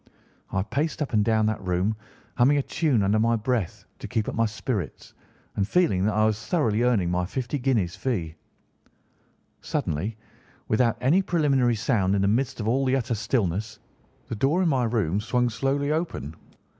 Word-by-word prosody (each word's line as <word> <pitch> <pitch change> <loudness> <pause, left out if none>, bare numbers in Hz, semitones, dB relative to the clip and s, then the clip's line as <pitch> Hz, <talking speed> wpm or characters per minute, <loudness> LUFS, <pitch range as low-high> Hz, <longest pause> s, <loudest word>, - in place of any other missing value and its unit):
I 95 - 0
paced 145 +9 -2
up 140 - -7
and 105 -1 +3
down 110 0 +2
the 110 0 0
room, 95 +3 0 0.4
humming 135 +4 +4
a 140 - +1
tune 145 -10 +1
under 100 +3 +2
my 115 +1 +3
breath 115 -4 -2
to - - -6
keep 110 - -1
up - - -3
my 115 0 +2
spirits 105 - -4 0.4
and 100 -1 0
feeling 165 - +2
that 105 0 +1
I 110 0 +3
was 110 -1 0
thoroughly 115 -10 +1
earning 110 -8 +2
my 90 0 0
fifty 130 +6 -3
guinea 120 -7 +2
fee. 85 -2 -3 1.3
"Suddenly, 95 +9 -2 0.5
without 115 +1 +2
any 150 +10 +4
preliminary 140 -9 +2
sound 105 -4 +1
in 100 - +1
the - - +3
midst 120 +6 0
of 105 - -3
the 130 +3 +2
utter 125 -2 -1
stillness, 110 -2 -1 0.5
the - - -5
door 145 - +2
of - - +2
my 130 -6 +2
room 105 -6 0
swung 125 +2 0
slowly 140 +4 0
open. 155 - -3
115 Hz, 175 wpm, -25 LUFS, 105-135 Hz, 1.3 s, humming